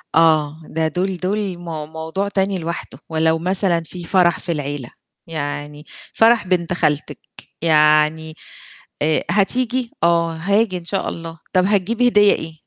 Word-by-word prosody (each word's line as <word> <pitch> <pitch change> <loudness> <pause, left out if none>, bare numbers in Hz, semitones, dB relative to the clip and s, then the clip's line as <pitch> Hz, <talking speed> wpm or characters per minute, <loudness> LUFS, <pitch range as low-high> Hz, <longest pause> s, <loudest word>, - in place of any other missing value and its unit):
آه، 155 -1 +3
ده 160 -1 +1
دول 180 +4 -2
دول 195 0 -2
مو 165 -3 -6
موضوع 160 +5 -4
تاني 195 -1 0
لوحده، 165 -5 -6
ولو 160 0 +1
مثلًا 180 -1 +1
في 175 +2 -9
فَرَح 175 0 +2
في 175 - -4
العيلة، 145 -5 -4 0.4
يعني 150 -1 -5 0.3
فَرَح 225 -3 +4
بنت 180 -1 0
خالتِك، 150 -4 -1 0.4
يعني 155 0 +4 0.7
آآ، 155 +1 +1
هتيجي؟ 245 +4 +1
آه 170 0 +2
هاجي 200 +4 0
إن 175 - -10
شاء 195 +3 -2
الله. 165 -1 -8 0.2
طَب 185 -1 +3
هتجيبي 210 +5 +1
هدية 205 -3 +5
إيه؟ 160 0 -5
170 Hz, 140 wpm, -19 LUFS, 160-195 Hz, 0.7 s, هدية